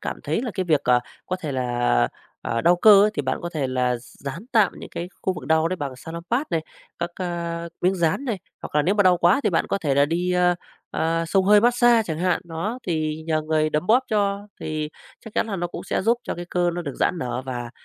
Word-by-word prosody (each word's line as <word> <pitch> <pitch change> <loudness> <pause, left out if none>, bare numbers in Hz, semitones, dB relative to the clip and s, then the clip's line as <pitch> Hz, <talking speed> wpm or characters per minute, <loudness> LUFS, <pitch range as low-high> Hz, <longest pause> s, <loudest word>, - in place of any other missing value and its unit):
cảm - - -5
thấy 230 - -1
là 245 - -3
cái 185 - -1
việc, 155 -5 +3
ờ, 125 0 +4 0.3
có 185 - -2
thể 155 -6 -5
là, 120 - +1 0.3
ờ, 115 - -1
đau 175 +1 +4
cơ 200 +2 +8
ấy 210 - +3
thì - - -1
bạn - - -1
có 175 - -3
thể 145 -5 -1
là 125 -1 0
dán 140 - -8
tạm 215 -5 +4
những - - -9
cái 175 - -5
khu 190 - +1
vực 130 - -8
đau 160 +2 +3
đấy 185 - -2
bằng 140 -5 -5
Salonpas 170 - -3
này, 165 -2 +1 0.4
các, 170 0 -2
ờ, 170 -2 -4
miếng 185 +2 +2
dán 170 - 0
này, 230 -6 -2 0.2
hoặc - - -8
là 150 - +4
nếu 185 +7 +2
mà 205 - +4
đau 185 -2 +5
quá 175 +8 +4
thì - - +3
bạn - - +1
có - - -1
thể 150 -7 0
là 140 +1 +5
đi, 175 +3 0
ờ, 180 0 +3 0.4
ờ, 165 +1 0
xông 190 +3 +2
hơi 205 +1 +6
mát-xa 240 -1 +4
chẳng 160 -3 -4
hạn, 180 0 +1
nó, 175 +8 -4
thì 155 -2 -1
nhờ 155 -1 +1
người 155 0 +1
đấm 155 +4 -1
bóp 250 +4 +4
cho 205 -1 0
thì 155 -1 -3 0.4
chắc 220 - -11
chắn - - +1
là 205 -3 -3
nó 175 0 -1
cũng - - -8
sẽ - - -1
giúp 235 +4 +2
cho - - -3
cái 175 - -6
cơ 175 -1 +2
nó 175 - -3
được 140 -5 -5
giãn 180 - 0
nở 125 0 -3
và 120 -2 -4
170 Hz, 255 wpm, -23 LUFS, 155-195 Hz, 0.4 s, cơ